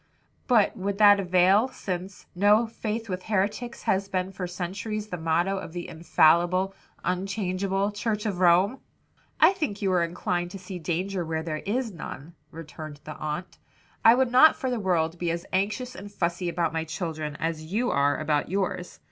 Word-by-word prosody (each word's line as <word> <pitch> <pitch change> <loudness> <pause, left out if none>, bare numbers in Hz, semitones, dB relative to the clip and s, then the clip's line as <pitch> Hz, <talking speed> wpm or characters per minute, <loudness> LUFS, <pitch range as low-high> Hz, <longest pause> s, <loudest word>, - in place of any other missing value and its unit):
"But 235 -5 +4
would 200 -1 -3
that 205 -1 +7
avail, 185 +4 +4
since, 185 -6 -6
'No 205 +5 +4
faith 225 0 -4
with 185 -2 -4
heretics,' 215 +4 -2
has 195 +1 +1
been 185 -1 -1
for 185 -1 -5
centuries 195 +4 -4
the 180 - -4
motto 170 +4 0
of 165 -3 -8
the 175 -1 -5
'infallible, 175 +3 +3 0.3
unchangeable,' 195 +1 -1
Church 210 0 -2
of 195 -4 -2
Rome?" 185 +7 +4 0.6
"I - - +7
think 300 - -3
you 195 - +2
are 180 -1 +3
inclined 175 +1 -2
to 195 - -8
see 185 -1 -8
danger 180 +3 -2
where 160 -1 -3
there 155 -2 -4
is 235 +2 -1
none," 165 -2 -8 0.2
returned 155 -2 -9
the 155 0 -8
aunt. 155 +4 -5 0.4
"I 225 +1 +8
would 255 -1 +2
not 260 +6 +7
for 260 - -3
the 245 - -1
world 170 -4 0
be 175 - -1
as 170 +1 -3
anxious 210 +7 -1
and 200 +2 -9
fussy 175 -2 -1
about 170 -2 -1
my 160 0 -1
children 155 -2 -4
as 160 0 -3
you 240 +5 +1
are 140 +1 +2
about 150 -1 0
yours. 185 -1 -2
185 Hz, 175 wpm, -26 LUFS, 170-205 Hz, 0.6 s, I